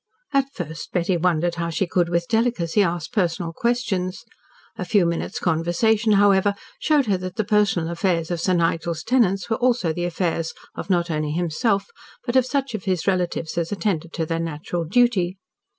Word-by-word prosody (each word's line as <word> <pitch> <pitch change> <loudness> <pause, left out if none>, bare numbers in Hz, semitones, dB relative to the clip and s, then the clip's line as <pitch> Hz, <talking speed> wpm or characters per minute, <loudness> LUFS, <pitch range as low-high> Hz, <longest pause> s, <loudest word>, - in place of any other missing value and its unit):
At 275 0 +2
first 160 - -7
Betty 180 +1 +1
wondered 175 0 +1
how 170 - -1
she 170 +4 0
could 175 0 +1
with 170 0 0
delicacy 220 -5 +1
ask 170 -2 -1
personal 175 -5 0
questions. 200 -4 -1 0.5
A - - -4
few 200 -5 +3
minutes' 170 0 -2
conversation, 205 +7 +2
however, 200 0 +4 0.2
showed 300 -3 +3
her 200 -4 +1
that 185 0 -6
the 220 - 0
personal 205 -5 +2
affairs 170 -1 0
of 170 -1 -2
Sir 185 - +2
Nigel's 165 -1 0
tenants 195 -7 +2
were 225 - 0
also 240 -10 +1
the 175 +2 -2
affairs 165 -2 -2 0.2
of - - -7
not 175 -2 +1
only 150 -1 -1
himself, 175 +5 0 0.4
but 240 - -2
of 255 -1 +4
such 275 -2 -1
of 215 -5 -5
his 185 -3 0
relatives 175 -3 -1
as 170 +2 -3
attended 170 -4 -1
to 165 - -1
their 165 +1 -2
natural 165 +1 -3
duty. 195 -2 +2
180 Hz, 180 wpm, -23 LUFS, 170-210 Hz, 0.5 s, however